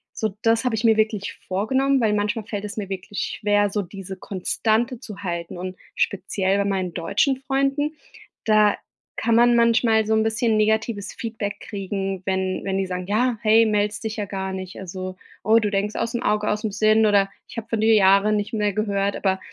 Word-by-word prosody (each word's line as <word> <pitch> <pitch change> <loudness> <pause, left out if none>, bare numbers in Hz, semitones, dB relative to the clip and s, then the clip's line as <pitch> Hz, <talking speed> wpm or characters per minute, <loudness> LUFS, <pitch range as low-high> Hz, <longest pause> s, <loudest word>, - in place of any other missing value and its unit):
so 215 -2 -2
das 225 0 +3
habe 245 -3 +1
ich 220 - -3
mir 225 -2 +4
wirklich 215 -2 0
vorgenommen, 265 +8 +1
weil 215 -2 +2
manchmal 210 +1 -1
fällt 210 -2 -4
es 205 - -7
mir 205 -2 -3
wirklich 195 +1 -4
schwer, 205 -1 +2
so 205 - 0
diese 195 +1 -8
Konstante 220 +6 -1
zu 210 -5 -10
halten 170 -2 -4
und 185 +1 -5 0.2
speziell 195 -1 0
bei 200 - +1
meinen 190 -3 -1
deutschen 235 - +1
Freunden, 275 +3 0 0.5
da 215 -1 +4 0.4
kann 230 +1 +1
man 240 +1 +5
manchmal 230 -1 +3
so 220 - +1
'n 220 - +3
bisschen 220 +1 +1
negatives 215 -1 0
Feedback 220 -3 -5
kriegen, 195 -2 -4
wenn 190 -1 -1
wenn 195 -1 -1
die 195 - 0
sagen 180 0 -4
ja: 230 +4 +1
„Hey, 220 +1 +5
meldest 210 -1 0
dich 220 0 -3
ja 210 - -2
gar 190 -1 -4
nicht“, 185 0 -7
also: 185 0 -6 0.3
„Oh, 220 +3 +5
du 210 -2 -1
denkst 205 +1 -1
ausm 230 +1 -2
Auge 210 0 +1
ausm 210 0 -1
Sinn“, 215 +2 +3
oder: 200 -1 +3 0.2
„Ich - - -12
habe 225 - -5
von 225 -2 -1
dir 220 0 +5
Jahre 200 +1 +5
nicht 210 +1 -2
mehr 210 -2 0
gehört“, 200 -1 0
aber 190 -1 0
210 Hz, 195 wpm, -23 LUFS, 195-225 Hz, 0.5 s, man